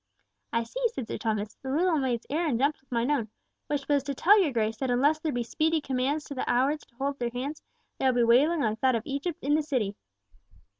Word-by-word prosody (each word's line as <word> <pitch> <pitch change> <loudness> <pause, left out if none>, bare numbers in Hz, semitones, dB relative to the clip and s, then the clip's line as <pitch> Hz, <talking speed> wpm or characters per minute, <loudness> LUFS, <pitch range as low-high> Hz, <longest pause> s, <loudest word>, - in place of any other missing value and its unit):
"I 230 0 +1
see," - - -7
said 265 - -6
Sir - - -4
Thomas. 215 -2 -2
"This 265 - -4
little 325 +2 +2
maid's 250 -3 -1
errand 305 -4 0
jumps 280 +4 +1
with 270 - -38
mine 240 +3 +1
own, 235 -7 0 0.4
which 285 -2 -2
was 285 -1 +3
to 280 0 -3
tell 405 +9 +6
your 320 -6 +1
Grace 220 -2 0
that 265 +2 -2
unless 285 +6 +3
there 310 -1 -2
be 245 -2 -1
speedy 315 +7 +1
commands 275 +2 -1
to 285 - -7
the 260 - -3
Howards 275 +5 +1
to 235 - -32
hold 275 +2 -2
their 240 -1 -1
hands, 265 +6 -5 0.4
there 265 - +3
will 245 -1 +1
be - - +5
wailing 285 +8 +4
like 220 -2 -1
that 260 -2 +3
of 225 - -2
Egypt 285 +4 -3
in 285 +2 +2
the 310 - +3
City. 250 -9 -1
270 Hz, 240 wpm, -28 LUFS, 240-300 Hz, 0.4 s, tell